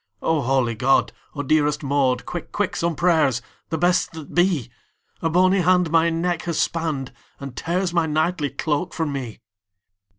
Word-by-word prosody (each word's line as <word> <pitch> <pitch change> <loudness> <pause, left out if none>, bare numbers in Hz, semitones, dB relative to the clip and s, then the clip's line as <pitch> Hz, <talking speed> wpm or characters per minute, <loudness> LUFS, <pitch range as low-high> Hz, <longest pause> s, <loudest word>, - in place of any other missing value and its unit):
"O 160 -2 +1
holy 130 -2 +1
God! 135 +5 +2 0.2
O 145 - -3
dearest 150 +1 +1
Maud, 135 -2 +1
Quick, - - -6
quick, - - -1
some 170 -1 -1
prayers, 155 -8 +2 0.3
the 160 - -1
best 175 +2 +1
that 160 -3 -9
be! 175 - +1 0.5
A 165 - +1
bony 185 +3 +3
hand 180 -1 +3
my 165 0 +4
neck 170 +1 -1
has 170 -2 -1
spanned, 155 -6 -1 0.3
And 135 -3 -8
tears 175 +4 -1
my 170 -2 +2
knightly 155 0 0
cloak 155 +5 -2
from 160 -4 -1
me!" 125 -5 -6
160 Hz, 165 wpm, -22 LUFS, 140-175 Hz, 0.5 s, my